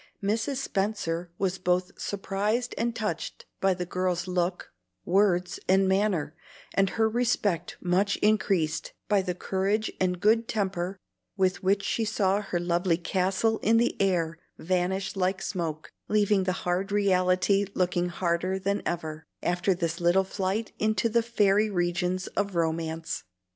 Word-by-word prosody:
Mrs. 225 +7 0
Spenser 195 -8 -2
was 190 -1 -1
both 180 +1 +1
surprised 205 +5 -1
and 235 0 -1
touched 210 -8 -4
by 195 -1 +2
the 180 0 -3
girl's 180 -1 -1
look, 180 0 -2 0.3
words, 180 -1 +2
and 190 +1 +4
manner, 190 -6 +1 0.4
and 195 -1 +3
her 220 -1 +4
respect 220 -7 0
much 190 +3 +1
increased 195 -7 +1
by 205 -2 +3
the 180 -2 -3
courage 195 +4 0
and 180 -1 +1
good 225 +4 +3
temper 190 -3 -2 0.4
with 185 -1 +1
which 195 +1 +2
she 230 - 0
saw 205 -2 +1
her 185 -4 -2
lovely 175 0 +1
castle 190 +5 0
in 225 +1 +3
the 240 +1 +2
air 170 -4 +1 0.2
vanish 185 +3 -1
like 185 0 0
smoke, 160 -5 -4 0.2
leaving 205 -2 +2
the 185 - +1
hard 180 +3 0
reality 195 0 +3
looking 180 -1 +1
harder 175 +1 0
than 200 +1 -1
ever, 160 -2 -3 0.2
after 180 +2 +1
this 170 0 -2
little 175 +3 +4
flight 195 +3 -2
into 215 +1 +1
the 235 +1 +3
fairy 215 -2 +2
regions 180 0 0
of 200 -2 -2
romance. 165 - -1
190 Hz, 145 wpm, -27 LUFS, 175-205 Hz, 0.4 s, and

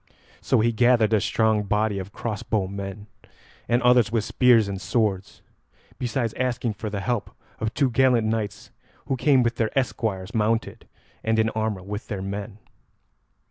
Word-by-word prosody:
So - - +2
he 115 +1 +2
gathered 115 -1 +3
a 105 - +3
strong 110 0 +2
body 105 0 0
of 95 +1 -7
crossbow 105 -2 -2
men, 100 +1 -6 0.6
and 120 +1 +2
others 125 -2 +4
with 115 -2 +1
spears 120 -3 +4
and 100 -1 -5
swords, 100 -5 -1 0.6
besides 120 -2 -1
asking 125 -2 -1
for 105 +1 -5
the 100 -1 -4
help 120 +1 -2 0.3
of 110 0 -1
two 135 -4 +2
gallant 125 -2 +3
knights 110 -2 -3 0.3
who 135 - -1
came 135 -1 +3
with 120 0 -1
their 110 -2 +1
esquires 110 -7 -2
mounted 110 0 -1 0.4
and 110 0 +1
in 110 0 +2
armour 110 -4 -2
with 105 +3 -6
their 100 -4 -4
men. 100 +1 -5
110 Hz, 160 wpm, -24 LUFS, 105-120 Hz, 0.6 s, others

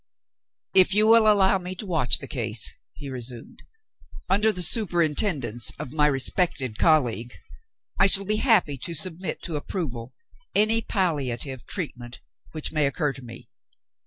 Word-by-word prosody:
"If 190 0 +4
you 210 +1 +5
will 220 -1 +6
allow 195 -2 +3
me 180 +1 -7
to 210 - -6
watch 160 -9 +2
the - - -10
case," - - +1 0.2
he 140 - -10
resumed, 125 -2 -7 0.7
"under 210 +3 +3
the 180 -3 -1
superintendence 160 - 0
of 125 - -8
my 150 -1 +3
respected 135 - +1
colleague, 125 -7 +1 0.6
I 195 - +5
shall 195 0 +4
be 215 +2 0
happy 210 - +2
to 165 +7 -4
submit 165 +1 -3
to 165 -4 -2
approval 130 -7 -6 0.4
any 220 +2 +3
palliative 140 - -2
treatment 125 -10 -4 0.3
which 155 -2 -5
may 150 -3 +2
occur 145 0 -1
to 135 - -9
me. 115 -2 -12
160 Hz, 145 wpm, -24 LUFS, 130-190 Hz, 0.7 s, will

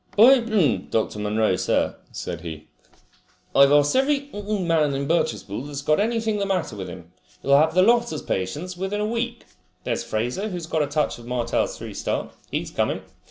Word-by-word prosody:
"By, 250 +5 +8 0.5
Dr. 110 -1 -1
Munro, 105 +1 +1
sir," - - +1 0.2
said - - -5
he, 80 -2 -7 0.9
"I've 140 0 +7
asked 145 0 +4
every 280 +1 +1
man 175 -8 0
in 140 0 -2
Birchespool 120 - -1
that's 140 -1 -6
got 155 +1 +3
anything 220 -1 0
the 200 - 0
matter 180 - -1
with 95 -2 -6
him. 85 -1 -11 0.3
You'll 140 +1 +5
have 160 +2 +2
the 185 - +6
lot 235 0 +4
as 155 - -5
patients 150 - -3
within 190 +3 -3
a 210 - 0
week. 235 +2 -3 0.4
There's - - -2
Fraser, 125 - -2
who's 175 -4 -5
got 160 -1 0
a 145 - +1
touch 145 -3 -1
of 120 - -12
Martell's 125 -1 -1
three - - -7
star. - - -3 0.2
He's - - -3
coming. - - -1
155 Hz, 180 wpm, -24 LUFS, -, 0.9 s, By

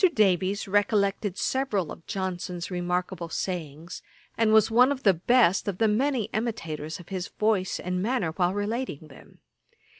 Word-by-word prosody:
Davies 195 0 +2
recollected 200 -1 +1
several 215 - -1
of 165 - -11
Johnson's 180 -2 -4
remarkable 180 -1 -2
sayings, 165 -2 -5 0.3
and 225 -1 +2
was 220 0 +5
one 250 +4 +5
of 275 -1 -3
the 195 - +6
best 195 +2 +3
of 195 -3 -2
the 225 - +3
many 250 +3 +1
imitators 165 -9 -3
of 175 - -13
his 185 -1 -3
voice 210 -4 0
and 180 0 -2
manner, 215 -6 0
while 180 +2 0
relating 205 - -3
them. 135 - -17
195 Hz, 150 wpm, -26 LUFS, 175-220 Hz, 0.3 s, the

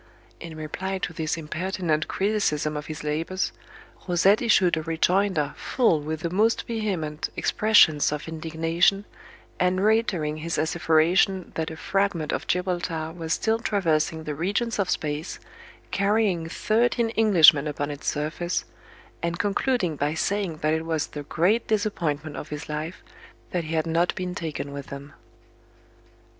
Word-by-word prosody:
In 165 -2 -8
reply 190 +5 -4
to 175 - -4
this 160 0 -2
impertinent 165 0 -2
criticism 190 -7 0
of 150 0 -5
his 155 -1 -6
labors, 165 +5 -1 0.6
Rosette 190 +4 +4
issued 190 -7 +4
a 160 - -2
rejoinder 165 -1 +1
full 200 - +1
with 155 +1 -4
the 170 - -2
most 215 +5 +2
vehement 185 -10 -2
expressions 210 -10 +4
of 150 +1 -4
indignation, 165 +4 +1 0.5
and 185 +2 +2
reiterating 185 -9 +1
his 165 +1 -3
asseveration 165 +4 +2
that 160 +1 -2
a 160 - -8
fragment 195 -4 0
of - - -3
Gibraltar 175 -3 -1
was 165 -2 -2
still 225 0 +1
traversing 160 -7 0
the 150 - -4
regions 205 +9 -1
of 190 -3 +1
space, 150 +2 -2 0.5
carrying 200 -5 +1
thirteen 230 +4 +1
Englishmen 165 -9 +6
upon 145 0 -3
its 145 0 -8
surface, 155 +4 -1 0.6
and 170 0 -2
concluding 200 - 0
by 145 +2 0
saying 195 -2 -1
that 155 0 +2
it 160 0 -1
was 160 -2 -1
the 150 - -7
great 180 +10 +1
disappointment 160 -9 -1
of - - -7
his 150 +1 -6
life 155 +3 -5 0.5
that 175 -3 -1
he 160 +1 -3
had 160 - +1
not 165 +2 +1
been 180 -1 -3
taken 155 -5 -5
with 140 -1 -7
them. 140 +1 -9
165 Hz, 145 wpm, -25 LUFS, 155-195 Hz, 0.6 s, Englishmen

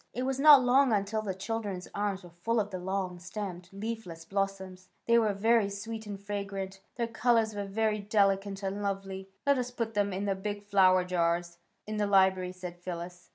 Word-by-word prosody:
It 250 - -1
was 265 0 -1
not 290 -2 +9
long 260 +1 +4
until 210 +1 0
the 195 -3 -3
children's 200 -2 -4
arms 200 -2 -2
were 175 - -12
full 225 +8 -1
of 205 -1 -2
the 185 - -4
long 185 -1 -3
stemmed, 180 -1 -6
leafless 195 -5 -6
blos 195 +1 -1
soms. 185 -1 -11 0.2
They 235 0 +5
were 220 -2 +2
very 220 0 +3
sweet 220 +2 -6
and 200 -1 -6
fragrant. 195 -1 -5
Their 235 - 0
colours 230 -1 +2
were 205 -1 -3
very 215 +2 0
delicate 200 -1 +1
and 195 +1 -2
lovely. 195 -1 -3
^^ - - -27 0.2
Let 280 -2 +4
us 250 0 -2
put 230 -2 -3
them 205 -1 +1
in 190 +2 -2
the 200 - +1
big 205 +1 -4
flower 185 -2 +5
jars 170 -1 0 0.3
in 215 0 -4
the 205 -1 +1
library," 190 -2 +3
said 180 -1 -8
Phyllis. 175 0 -7
200 Hz, 200 wpm, -30 LUFS, 185-220 Hz, 0.3 s, not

